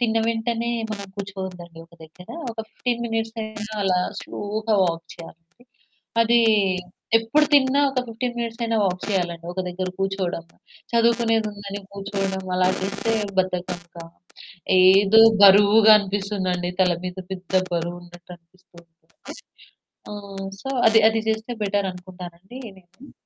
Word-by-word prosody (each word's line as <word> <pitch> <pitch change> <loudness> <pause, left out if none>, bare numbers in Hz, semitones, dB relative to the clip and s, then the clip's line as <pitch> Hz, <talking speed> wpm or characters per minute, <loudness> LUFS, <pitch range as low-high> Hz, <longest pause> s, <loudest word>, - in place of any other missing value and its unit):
తిన్న 225 -2 +1
వెంటనే 230 +1 -1 0.2
మనం 200 -2 -5
కూర్చోద్దండి 190 -4 -7
ఒక 170 - -21
దగ్గర. 170 +3 -16 0.2
ఒక 225 - -12
15 240 0 -3
మినిట్స్ 225 -1 -2
అయినా 215 0 -7
అలా 185 -2 +2 0.2
స్లోగా 215 +2 -3
వాక్ 165 -1 -2
చేయాలి. 165 0 -12 0.8
అది 235 +1 +3 0.8
ఎప్పుడు 260 +7 +2
తిన్నా 275 0 +4
ఒక 265 -1 -1
15 240 +2 -4
మినిట్స్ 235 0 -4
అయిన 230 0 -1
వాక్ 185 -1 -2
చేయాలండి 175 -3 -2
ఒక 185 - -3
దగ్గర 185 +1 -4
కూర్చోవడం 195 -3 -2 0.5
చదువుకునేదుందని 225 -4 0
కూర్చోవడం 195 -1 -3
అలా 185 0 +3
చేస్తే 200 +4 -2 0.3
బద్ధకంగా, 175 -2 -3 0.8
ఏదో 195 +4 +6 0.2
బరువుగా 205 +2 +7
అనిపిస్తుందండి 195 -3 -2
తల 180 -1 +4
మీద 180 0 -5
పెద్ద 185 -1 -8 0.2
బరువు 170 +1 -2
ఉన్నట్టనిపిస్తుంది. 175 0 -16 1.2
ఆహ్, 200 -2 -7
సో, 270 - -6 0.2
అది 225 0 +6
అది 225 0 -1
చేస్తే 220 +2 -2
బెటరనుకుంటానండి. 185 0 -5 0.2
నేను 195 +9 -18
195 Hz, 120 wpm, -23 LUFS, 180-225 Hz, 1.2 s, బరువుగా